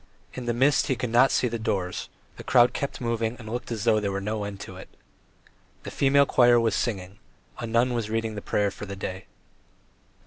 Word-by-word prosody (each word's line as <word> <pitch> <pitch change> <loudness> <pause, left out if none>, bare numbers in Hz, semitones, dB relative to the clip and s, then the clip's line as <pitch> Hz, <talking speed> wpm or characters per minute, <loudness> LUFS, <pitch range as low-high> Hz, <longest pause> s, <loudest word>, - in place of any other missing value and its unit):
In 125 - -6
the - - +2
mist 135 +3 +3
he 130 - +1
could 125 -1 -4
not 125 +3 +5
see 125 - +1
the 115 -1 -3
doors; 95 -4 -2 0.3
the - - -8
crowd 120 0 +4
kept 140 - -4
moving 115 -1 -1
and 110 - -11
looked 120 +2 -5
as 110 -3 -3
though 115 -2 +3
there 100 -2 -2
were 100 - -2
no 105 +1 -3
end 100 -1 -7
to 95 - -8
it. 95 - -11 0.9
The - - -7
female 140 +1 +4
choir 120 -2 +5
was 115 -2 +1
singing, 95 -3 -3 0.4
a 115 - -4
nun 120 +2 +2
was 115 -3 -2
reading 115 0 -1
the 105 - -6
prayers 100 0 0
for 105 - -8
the 100 - -6
day. 95 -1 -6
115 Hz, 215 wpm, -26 LUFS, 100-120 Hz, 0.9 s, not